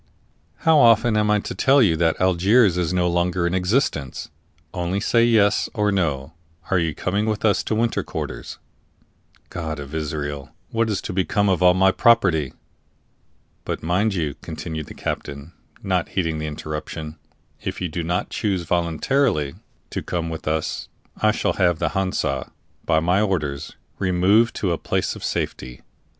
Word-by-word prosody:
"How 160 -2 +6
often 115 -2 +5
am 105 0 +2
I 105 -1 +3
to - - -5
tell 135 +1 +4
you 100 -10 +4
that 80 0 +1
Algiers 95 +3 +4
is 90 -2 0
no 90 -1 +1
longer 85 0 0
in 85 - 0
existence? 90 - -1 0.4
Only 90 +2 -1
say 115 +2 +3
yes 110 -3 +3
or 105 -2 +2
no 80 -6 -1 0.4
are 90 - +4
you 80 -3 -1
coming 100 +4 -1
with 110 0 -1
us 105 - +3
into 110 - -2
winter 115 +1 +1
quarters?" - - -6 0.9
"God 80 -3 -4
of 70 +1 -8
Israel! 75 -3 -4 0.2
what 115 0 +1
is 105 - -2
to - - -4
become 95 +2 +1
of 90 -2 +1
all 90 0 +6
my 95 +1 +4
property?" 95 - +3 1.1
"But, - - -4
mind 95 +5 +1
you," 80 -5 -1
continued 80 -1 -6
the - - -10
captain, 70 +3 -5 0.3
not 95 -3 0
heeding 80 -4 -1
the 75 - -3
interruption, 75 +1 -6 0.4
"if - - -4
you 90 - -1
do 85 +2 -4
not 85 +2 -2
choose 95 -5 -1
voluntarily 85 - 0 0.4
to - - -3
come 85 -2 -3
with 80 - -7
us, 80 0 -2 0.3
I 110 - +4
shall - - 0
have 90 -4 +2
the - - 0
Hansa, 95 -8 -2 0.3
by 80 -2 +3
my 90 +4 +2
orders, 75 -9 -2 0.2
removed 95 +5 +3
to 95 - -1
a 85 - -1
place - - -1
of - - -10
safety. 60 0 -4
90 Hz, 165 wpm, -22 LUFS, 80-105 Hz, 1.1 s, How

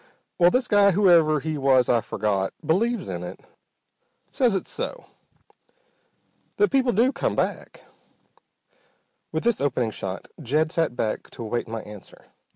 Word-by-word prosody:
Well, 175 0 +6
this 250 +4 +1
guy, 205 -1 +5
whoever 170 -6 +4
he 155 0 -3
was 130 -2 +3
I've 120 -2 +2
forgot, 100 -2 -1
believes 230 +7 0
in 90 -2 -5
it. 90 - -8 0.9
Says 245 -6 +2
it's 190 - -3
so. - - -5 1.5
That 415 - +3
people 265 -2 +2
do 240 +6 +3
come - - -2
back." - - -3 1.5
With - - -2
this 235 -7 +1
opening 125 -5 0
shot 95 -2 -6
Jed 155 +4 0
sat 165 -8 0
back 110 -3 -3
to 120 - -9
await 120 +2 -3
my 115 -1 -5
answer. 105 -2 -13
155 Hz, 145 wpm, -24 LUFS, -, 1.5 s, Well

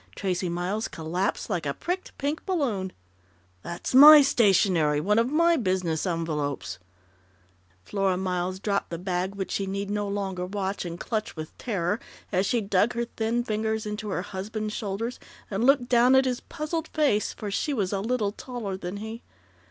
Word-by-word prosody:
Tracey 185 -2 -1
Miles 180 +6 -2
collapsed 175 +5 -2
like 175 -8 -2
a 140 - -2
pricked 365 +2 -4
pink 290 +3 -2
balloon. 245 - -1 0.7
"That's 170 - -5
my 295 +3 +11
stationery 190 - +3
one 210 +7 +2
of 235 +2 +2
my 335 +2 +4
business 185 - 0
envelopes 155 - -2 0.5
" 90 0 -36
Flora 195 -2 0
Miles 185 0 -1
dropped 200 0 -1
the 170 - -4
bag 185 +2 -2
which 195 -1 -4
she 195 - -1
need 200 +1 -3
no 205 0 -1
longer 190 -3 -3
watch 195 0 -3
and 170 0 -6
clutch 215 -2 -3
with 155 -1 -7
terror, 200 -3 -1 0.3
as 190 0 +1
she 240 - +1
dug 200 +3 +2
her 235 0 -1
thin 235 +1 -1
fingers 220 -1 -1
into 210 0 -4
her 185 -2 -2
husband's 210 +3 -4
shoulders 215 +4 -3 0.3
and 205 +4 0
looked 265 -2 +4
down 245 +1 +5
at 265 0 +5
his 250 -2 0
puzzled 320 0 -4
face, 285 -10 +1
for 205 -2 -6
she 295 - -1
was 205 -8 -1
a 195 - 0
little 220 -2 0
taller 220 -3 -5
than 185 +1 -5
he. 220 +3 -6
200 Hz, 175 wpm, -26 LUFS, 180-235 Hz, 0.7 s, my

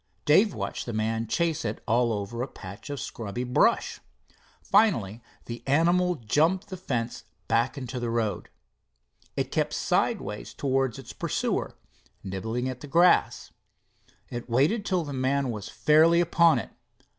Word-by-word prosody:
Dave 195 +8 +4
watched - - -4
the 120 - -3
man 110 +1 -1
chase 165 +4 0
it 105 - -3
all 120 +1 +2
over 110 +3 -3
a 130 - -2
patch 100 0 -10
of 145 -1 -4
scrubby 115 +1 -5
brush. 125 0 +2 0.6
Finally 120 - +2 0.2
the 115 0 -7
animal 175 +5 +3
jumped 160 - +1
the 190 - -5
fence 120 -10 -3 0.2
back 120 +5 +1
into 130 -2 -5
the 120 -1 -2
road. 115 -2 -2 0.9
It - - -1
kept - - 0
sideways - - -1
towards 135 -2 0
its 135 - -9
pursuer, - - -2 0.5
nibbling 110 +6 -3
at 130 -1 -5
the 145 - -8
grass. 170 +4 +3 0.8
It 120 0 -6
waited 155 - +2
till 185 -3 +1
the 145 -2 -6
man 130 0 0
was 105 -3 -6
fairly 160 +3 +4
upon 170 -3 +4
it. 120 - -5
130 Hz, 145 wpm, -27 LUFS, 115-165 Hz, 0.9 s, Dave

